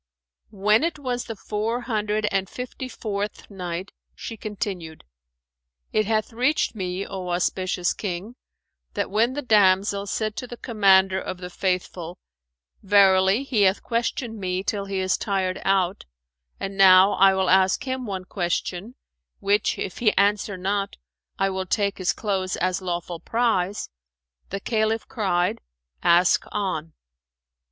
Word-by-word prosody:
When 210 +5 +3
it 335 -1 -1
was 250 -4 -3
the 225 - -6
Four 220 +4 -2
Hundred 215 -3 -1
and 195 -1 0
Fifty 255 +1 -6
fourth 205 -3 -5
Night, 180 -1 -5 0.2
She 225 - -7
continued, 190 -6 -5 0.9
It 215 -1 +2
hath 220 +1 0
reached 255 +6 +1
me, 185 -2 -3
O 185 -2 -6
auspicious 180 +1 0
King, 200 +3 -5 0.6
that - - -2
when 230 +5 +2
the 290 +1 -4
damsel 200 -2 +3
said 215 +2 -2
to 250 - -4
the 240 - -8
Commander 190 -5 +3
of 185 - -5
the 180 0 -8
Faithful, 180 -2 -2 0.6
"Verily 195 +2 +4
he 250 -6 0
hath 195 0 +3
questioned 230 -1 -2
me 185 -1 -2
till 200 -1 -2
he 195 -1 -3
is 185 0 +1
tired 190 -2 -1
out, 195 -1 +1 0.5
and 195 0 -4
now 190 0 +7
I 195 0 +5
will 190 -1 +1
ask 190 0 +4
him 260 -2 -3
one 190 -2 -4
question, 185 +4 -3 0.4
which 205 +1 +1
if 190 - -5
he 220 -3 +2
answer 200 0 +2
not 195 +2 -2 0.4
I 195 0 +1
will 190 0 -3
take 200 0 0
his 185 - +2
clothes 190 -3 -2
as 185 +1 0
lawful 175 -1 -4
prize," 210 - 0 0.6
the 195 - -3
Caliph 220 +1 0
cried, 180 -6 0 0.4
"Ask 175 +1 +4
on." 165 -6 -3
195 Hz, 145 wpm, -24 LUFS, 185-215 Hz, 0.9 s, now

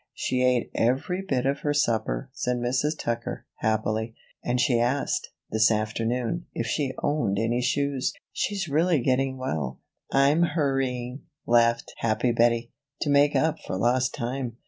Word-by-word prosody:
"She 125 - -1
ate 125 -2 +2
every 135 +10 0
bit 135 -10 -1
of 140 +1 +1
her 145 0 -1
supper," 110 - 0
said 125 0 -1
Mrs. 125 +6 0
Tucker, 120 0 -3
happily, 110 +1 -1 0.3
"and 125 +1 0
she 125 -2 +3
asked, 125 +4 0 0.2
this 110 0 +4
afternoon, 115 +8 -1
if - - -1
she 140 -4 -1
owned 135 -10 +1
any 115 +3 +1
shoes. 140 +1 0 0.2
She's 195 -2 -1
really 160 +2 +2
getting 130 +1 +1
well." 75 - -3 0.3
"I'm 140 +4 +4
hurrying," 135 -5 -1 0.2
laughed 115 0 +3
happy 115 +2 +1
Bettie, 115 0 +2 0.3
"to 145 - +1
make 145 +1 +4
up 160 0 +2
for 95 - -4
lost 125 +4 +1
time. 120 -2 -3
125 Hz, 145 wpm, -26 LUFS, 115-140 Hz, 0.3 s, this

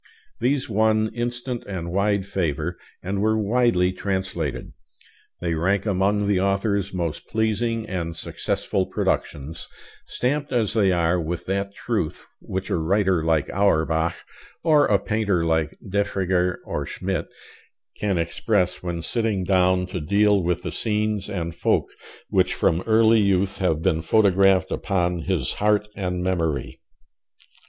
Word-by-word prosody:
These 135 +1 +1
won 110 0 +2
instant 120 +1 -3
and 85 -4 -4
wide 100 +1 +1
favor, 90 -7 -2 0.3
and 100 +2 -2
were 110 +1 +2
widely 110 -4 +2
translated. 95 -6 -3 0.7
They 85 -1 -1
rank 95 +5 +1
among 100 +1 +1
the 100 -2 +2
author's 100 0 0
most 85 -5 -3
pleasing 110 +1 0
and 85 -3 -3
successful - - -2
productions, 80 +4 -2 0.4
stamped 145 +4 -1
as 115 -4 +1
they 100 -4 +3
are 85 0 +2
with 85 +1 -4
that 100 +1 -2
truth 110 -10 -2 0.2
which 95 0 -5
a - - +2
writer 95 +1 +2
like 80 -3 +1
Auerbach, 80 -4 +2 0.5
or 155 -3 +5
a 105 - +4
painter 100 -4 0
like 80 -1 0
Defregger 95 -2 0
or - - -3
Schmidt, 95 -3 -3 0.7
can 100 -3 -1
express 90 +2 0
when 85 -2 -4
sitting 110 -4 0
down 90 0 +3
to 90 -1 -5
deal 100 +4 +3
with 90 0 -1
the 90 - -3
scenes 105 0 0
and 85 -4 -3
folk - - +1 0.4
which - - +2
from 85 +2 +2
early 110 0 +5
youth 100 -1 +1
have 80 -5 0
been 80 0 +2
photographed 95 0 +3
upon 90 -3 0
his 90 -9 0
heart 105 0 +3
and 90 -2 -2
memory. 80 -7 -1
95 Hz, 135 wpm, -23 LUFS, 85-105 Hz, 0.7 s, or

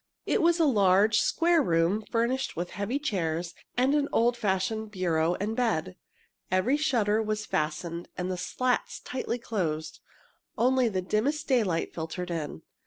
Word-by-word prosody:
It - - +1
was 340 +1 +3
a 325 - +5
large, 205 -3 +4
square 335 -1 +3
room, 170 - +1
furnished 240 +3 0
with 175 +2 -4
heavy 205 +8 -2
chairs 175 - -2 0.2
and 260 +3 +3
an 295 -1 +1
old 240 +1 +3
fashioned 220 0 -1
bureau 175 -4 0
and 210 +4 -3
bed. 215 - 0 0.5
Every 185 +9 +2
shutter 225 -8 +1
was 215 0 -2
fastened 165 +3 -2
and 180 +1 -2
the - - -1
slats 250 +7 -1
tightly 255 -2 -3
closed. 170 -10 -3 0.6
Only 255 0 +3
the 185 -3 -2
dimmest 245 +11 0
daylight 210 -11 +1
filtered 170 +2 -5
in. 155 - -4
210 Hz, 150 wpm, -28 LUFS, 175-250 Hz, 0.6 s, a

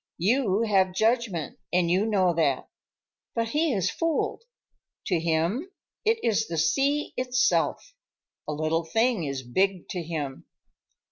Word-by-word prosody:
You 215 +2 +2
have 190 -4 +2
judgment, 220 - 0
and 175 -1 +2
you 195 +5 +2
know 190 -5 +3
that. 155 -5 +1 0.7
But 230 -1 0
he 310 +4 +1
is 195 -7 0
fooled. 330 +7 -1 0.6
To 180 -4 +1
him, 170 - 0 0.3
it 450 +1 +3
is 220 -1 +1
the 165 - -4
sea 275 - +1
itself. 255 - +1 0.5
A - - -2
little 155 +2 0
thing 225 +2 +1
is 135 -2 -4
big 185 +8 0
to 180 - -3
him." 155 -5 -5
190 Hz, 135 wpm, -26 LUFS, 165-240 Hz, 0.7 s, know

